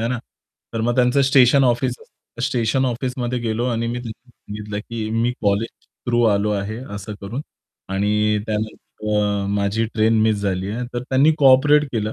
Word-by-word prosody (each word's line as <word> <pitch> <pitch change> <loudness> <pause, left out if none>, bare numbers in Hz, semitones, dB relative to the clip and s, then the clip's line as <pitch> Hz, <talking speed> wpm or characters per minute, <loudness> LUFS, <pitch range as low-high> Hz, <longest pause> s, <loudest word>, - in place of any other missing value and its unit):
है 115 - -1
ना, 125 0 -1 0.5
तर 115 - -2
मग 120 +2 +1
त्यांचं 125 +2 +3
स्टेशन 135 0 +5
ऑफिस 125 +1 +2
असतं 120 - -13
स्टेशन 125 +2 0
ऑफिसमध्ये 125 0 -2
गेलो 115 0 -2
आणि 115 -2 -1
मी 120 +1 -2
त्यांना 120 +1 -9
सांगितलं 105 -2 -7
की 110 0 -5
मी 115 +2 +1
कॉलेज 105 +3 +1 0.4
थ्रू 120 0 +2
आलो 100 +1 0
आहे 100 +2 -3 0.2
असं 100 +1 -6
करून 110 +7 -5 0.5
आणि 105 +2 +1
त्यानंतर 105 0 -4
अ, 100 -1 0
माझी 100 +2 0
ट्रेन 110 0 +3
मिस 110 -1 +3
झाली 95 0 -1
आहे 120 +3 -3
तर 120 - -2
त्यांनी 135 +4 +3
कोऑपरेट 145 +2 +5
केलं 110 -1 -1
115 Hz, 175 wpm, -21 LUFS, 105-125 Hz, 0.5 s, स्टेशन